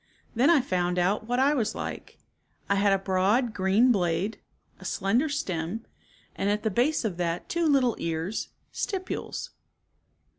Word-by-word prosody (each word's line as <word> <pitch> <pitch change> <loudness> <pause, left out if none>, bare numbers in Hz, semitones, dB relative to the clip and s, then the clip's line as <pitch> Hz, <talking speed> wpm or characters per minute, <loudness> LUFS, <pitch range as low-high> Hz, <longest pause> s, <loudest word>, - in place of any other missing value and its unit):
Then 250 +6 +3
I 330 -5 +6
found 180 -6 -1
out 195 +5 +1
what 245 +1 0
I 275 +3 +4
was 235 -7 0
like. - - -6 0.5
I - - +2
had 200 0 +3
a 195 - +4
broad 195 +5 +1
green 205 +6 +3
blade, 185 0 0 0.4
a - - -12
slender 225 +10 +1
stem, 200 - -3 0.5
and 200 - 0
at 210 +1 0
the 220 - 0
base 250 +5 +1
of 190 -6 -2
that 170 -1 -2
two 340 -1 0
little 265 -5 +3
ears, 165 +5 -2 0.3
stipules. 375 -2 -4
210 Hz, 155 wpm, -27 LUFS, 185-250 Hz, 0.5 s, I